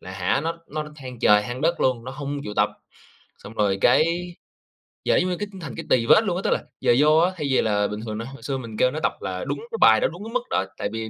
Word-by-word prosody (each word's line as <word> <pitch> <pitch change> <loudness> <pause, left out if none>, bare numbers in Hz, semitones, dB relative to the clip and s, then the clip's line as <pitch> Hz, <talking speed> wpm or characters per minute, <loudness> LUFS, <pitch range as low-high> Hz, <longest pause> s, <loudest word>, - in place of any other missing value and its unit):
là, 95 - -10
hả, 95 +7 0
nó 165 +2 -3
nó 155 0 -4
than 130 -4 -9
trời 105 -1 +5
than 120 +3 -5
đất 170 +3 +1
luôn, 125 -3 +1
nó 130 - -6
hông 145 0 -4
chịu 105 - -6
tập, - - +3 0.7
xong 105 - -11
rồi 100 -3 +1
cái 170 - +2 0.7
giờ - - +3
giống 185 - +1
như 180 - -2
cái 205 - -4
thành 145 -7 -7
cái - - -6
tì 115 -2 +3
vết 215 - +6
luôn 180 -4 0
á, - - -2
tức - - +1
là - - 0 0.2
giờ 120 - +4
vô 150 +2 +5
á, 175 +3 +4
thay 150 -3 -2
vì 130 - +4
là 105 -2 +1
bình 105 +1 -5
thường 110 -1 -4
nó 115 - -5
hồi 135 +3 -11
xưa 135 -2 -2
mình 115 -4 -8
kêu 125 - +3
nó 155 - -4
tập - - +2
là 90 -1 -4
đúng - - -3
cái 460 - -3
bài - - +7
đó, - - +3
đúng 210 - -9
cái 225 - -8
mức 250 -1 0
đó, 95 - 0
tại - - -2
vì 110 0 -4
130 Hz, 290 wpm, -24 LUFS, 110-165 Hz, 0.7 s, bài